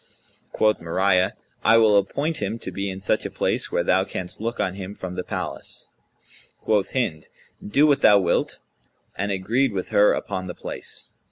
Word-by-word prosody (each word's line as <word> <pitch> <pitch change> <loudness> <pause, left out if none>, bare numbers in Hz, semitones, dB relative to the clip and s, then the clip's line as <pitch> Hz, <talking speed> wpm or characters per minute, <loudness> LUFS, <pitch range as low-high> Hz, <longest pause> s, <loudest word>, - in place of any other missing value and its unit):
Quoth 110 0 +2
Mariyah, 90 +2 +2 0.3
"I 115 - +6
will 110 -2 +5
appoint 140 +11 0
him 105 +2 -2
to - - -6
be 100 0 -3
in 95 0 -6
such 95 - 0
a - - -3
place, - - -1
where 85 - +1
thou 95 +1 +3
canst 90 0 -5
look 115 +2 -3
on 95 - 0
him 95 +1 -7
from 95 -3 -6
the 90 - -4
palace." - - -6 0.7
Quoth 105 -3 0
Hind, 105 -12 -1 0.4
"Do 140 +9 +3
what 145 -2 +3
thou 105 - +7
wilt," 90 -3 0 0.6
and 100 +2 -2
agreed 110 +6 +1
with 95 -2 -3
her 105 +1 +5
upon 95 0 -4
the 90 - -6
place. - - -7
100 Hz, 180 wpm, -23 LUFS, 95-110 Hz, 0.7 s, thou